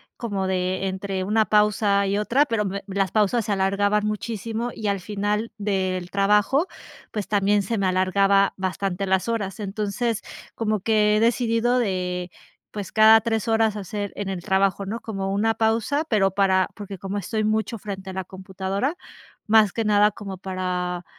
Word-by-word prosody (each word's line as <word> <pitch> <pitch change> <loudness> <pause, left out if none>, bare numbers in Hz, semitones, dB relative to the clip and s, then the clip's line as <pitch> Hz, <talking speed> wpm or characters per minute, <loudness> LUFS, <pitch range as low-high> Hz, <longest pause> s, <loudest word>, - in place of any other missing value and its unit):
como 200 -6 -3
de 185 0 -1
entre 190 0 -3
una 215 +2 +3
pausa 210 -1 +2
y 200 +1 0
otra, 240 +7 +2
pero 225 -6 0
me 200 0 -3
las 195 0 -1
pausas 215 +2 +2
se 215 - -2
alargaban 205 +2 +1
muchísimo, 225 +2 -3
y 215 - -4
al 200 -2 0
final 210 +3 -2
del 190 -3 -1
trabajo, 210 - +2 0.4
pues 210 -3 -4
también 205 0 +2
se 225 +4 -2
me 195 - 0
alargaba 195 +1 +3
bastante 190 0 -2
las 190 +2 +1
horas. 215 -4 -2
Entonces, 210 +3 -2 0.3
como 215 -2 0
que 210 +1 +3
he - - +2
decidido, 235 +1 +2
eh, 180 -3 -2 0.4
pues 205 -4 -6
cada 220 0 +7
3 225 0 -2
horas 225 -1 +2
hacer, 205 0 -5
en 205 -1 -4
el 190 -2 -4
trabajo, 195 +1 +1
¿no?, 220 +4 -4
como 195 -3 -3
una 220 +3 +2
pausa, 230 +7 +1
pero 195 -4 +3
para 190 -1 +2
porque 200 -2 -8
como 195 +2 -4
estoy 215 +3 -2
mucho 220 +2 0
frente 195 -2 -7
a - - -9
la 190 0 -3
computadora, 190 - -3 0.5
más 215 -2 +5
que 225 - -2
nada 210 0 +4
como 195 -2 -8
para 180 -1 -3
205 Hz, 170 wpm, -23 LUFS, 190-220 Hz, 0.5 s, cada